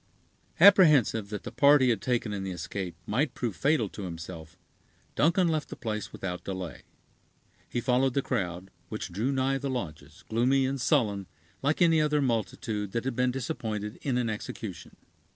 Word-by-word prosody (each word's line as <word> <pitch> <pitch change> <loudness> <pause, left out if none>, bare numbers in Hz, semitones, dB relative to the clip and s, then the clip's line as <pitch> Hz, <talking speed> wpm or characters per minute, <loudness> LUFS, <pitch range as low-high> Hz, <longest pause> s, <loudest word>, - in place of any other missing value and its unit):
Apprehensive 155 - +6
that 105 -1 -5
the - - -6
part 145 +1 +6
he 130 -1 +3
had 110 -5 +1
taken 120 -4 -1
in 100 -1 -3
the 95 - -3
escape 90 0 -5
might 135 +8 0
prove 115 -6 -3
fatal 140 -6 +2
to 105 - -9
himself, 85 -2 -8 0.6
Duncan 170 +4 +3
left 155 -2 -1
the - - -6
place 110 -5 -4
without 90 -2 -5
delay. 95 -8 -5 0.9
He 120 - -2
followed 130 +1 +2
the 140 - +1
crowd, 90 -5 -3 0.2
which - - -5
drew 110 +9 -1
nigh 135 0 +1
the 140 0 -3
lodges, 85 - -6
gloomy 130 +4 +2
and 135 0 -2
sullen, 105 - +1 0.3
like 145 +5 +2
any 165 -2 +4
other 150 -1 +2
multitude 110 -5 -2
that 115 +1 -2
had 135 -2 -2
been 125 +1 +2
disappointed 115 -5 -4
in 130 -3 0
an 125 -2 0
execution. 105 -4 -6
115 Hz, 170 wpm, -28 LUFS, 100-135 Hz, 0.9 s, Apprehensive